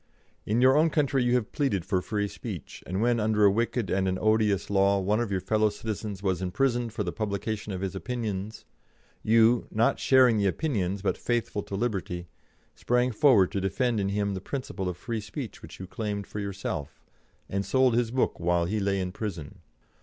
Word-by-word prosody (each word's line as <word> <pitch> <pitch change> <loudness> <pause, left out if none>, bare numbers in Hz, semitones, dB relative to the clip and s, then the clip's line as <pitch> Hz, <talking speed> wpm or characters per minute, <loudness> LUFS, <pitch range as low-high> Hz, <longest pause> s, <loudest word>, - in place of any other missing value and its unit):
"'In 110 +3 +2
your 130 +1 +6
own 160 +2 +4
country 140 -4 +1
you 120 0 +2
have 120 -4 -1
pleaded 110 - 0
for 95 -2 0
free 105 +1 -2
speech, - - -8
and 95 +4 -1
when, 120 -1 +2
under 105 -1 +3
a 100 - +6
wicked 115 -1 -1
and 95 0 +1
an 95 0 0
odious 110 -2 +2
law, 100 0 +3
one 105 +3 +1
of 120 -3 -1
your 95 - +1
fellow 110 +1 +2
citizens 105 -1 -5
was 95 -2 0
imprisoned 120 +5 0
for 105 - -3
the 90 - -3
publication 105 0 -3
of 95 -1 -4
his 95 -1 -3
opinions, 110 -1 -4 0.6
you, 115 +2 +4
not 110 +2 +1
sharing 125 -4 +5
the 100 - +2
opinions 100 - -1
but 100 - 0
faithful 120 -3 -1
to 100 - -6
liberty, 95 -6 -2 0.5
sprang 125 +1 +1
forward 110 - +4
to 100 -2 -2
defend 115 +4 0
in 100 -1 0
him 100 0 -1
the 95 - -5
principle 95 -6 -4
of 90 - -5
free 115 +3 -4
speech 100 -2 -7
which - - -11
you 95 - -6
claimed 100 +1 -4
for 105 - -7
yourself, 100 -8 -5 0.4
and 100 0 -2
sold 130 +2 +3
his 120 -1 +1
book 130 +2 0
while 85 0 +1
he 105 +5 -1
lay 100 -1 0
in 90 -1 -2
prison. 90 -8 -6
105 Hz, 200 wpm, -27 LUFS, 95-120 Hz, 0.6 s, your